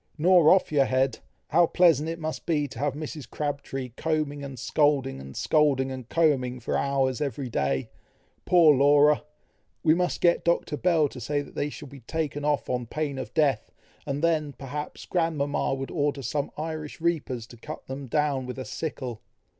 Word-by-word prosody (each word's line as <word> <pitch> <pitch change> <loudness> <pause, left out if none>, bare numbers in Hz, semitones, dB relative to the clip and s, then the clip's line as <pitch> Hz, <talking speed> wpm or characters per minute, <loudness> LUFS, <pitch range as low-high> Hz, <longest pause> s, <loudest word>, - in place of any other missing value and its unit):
"Nor 170 0 +6
off 185 -3 +4
your 140 -3 +4
head! 130 0 +1 0.3
How 170 +2 +5
pleasant 165 -4 +4
it 165 - -3
must 160 -1 -5
be 150 -4 +1
to 125 - -9
have 140 -1 0
Mrs. 150 -4 -7
Crabtree 140 -3 -4
combing 145 +2 -2
and 135 -2 -7
scolding, 140 - +1
and 65 0 -10
scolding 140 -4 +2
and 130 -3 -7
combing, 135 -6 +2
for 120 - -2
hours 135 -1 0
every 140 -2 -3
day! 70 -5 -1 0.5
Poor 165 -5 +6
Laura! 145 +2 +5 0.6
we 155 - +5
must 180 +1 0
get 170 -1 +3
Dr. 170 -3 +1
Bell 165 -2 +3
to 125 - -10
say 145 +5 -1
that - - -14
they 145 - -1
shall 150 0 -9
be 140 +1 -12
taken 145 +3 -3
off 145 -1 0
on 125 -2 -2
pain 145 0 -3
of 120 -5 -6
death, 150 -4 +1 0.4
and 140 +2 -2
then, 155 -3 +1
perhaps, 145 +3 -6
grandmama 150 -6 0
would 135 0 -5
order 145 -3 -1
some 140 +4 -2
Irish 155 0 -5
reapers 150 -8 -1
to 120 0 -14
cut - - -8
them 135 +1 -6
down 140 -1 0
with 125 - -6
a 130 - -5
sickle." 130 -8 -5
145 Hz, 180 wpm, -26 LUFS, 130-155 Hz, 0.6 s, Nor